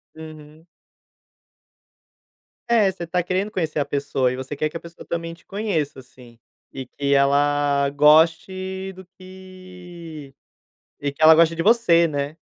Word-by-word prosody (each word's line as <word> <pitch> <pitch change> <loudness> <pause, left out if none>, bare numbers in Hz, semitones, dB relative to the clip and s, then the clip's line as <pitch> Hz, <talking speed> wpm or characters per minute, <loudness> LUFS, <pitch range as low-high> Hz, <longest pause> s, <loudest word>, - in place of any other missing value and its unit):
Uhum. 155 0 -13 2.0
É, 220 -5 +3
você 175 -2 -8
tá 180 +1 -1
querendo 190 +3 -2
conhecer 160 -6 -3
a 145 - 0
pessoa 140 -2 -1
e 125 - -4
você 130 +2 -7
quer 150 +2 -1
que 155 - -20
a - - -3
pessoa 170 +1 -13
também 165 0 -4
te 170 - -19
conheça 190 -10 -3
assim. 125 -2 -18 0.4
E 130 -1 -7
que 140 +2 -2
ela 140 0 +2
goste 165 +6 +2
do 190 0 -13
que 180 -5 -12 0.7
e 145 -1 -2
que 140 - -15
ela 160 0 +8
goste 165 0 +3
de 165 - -2
você, 175 -6 +4
né? 145 0 -4
160 Hz, 150 wpm, -22 LUFS, 145-185 Hz, 2.0 s, ela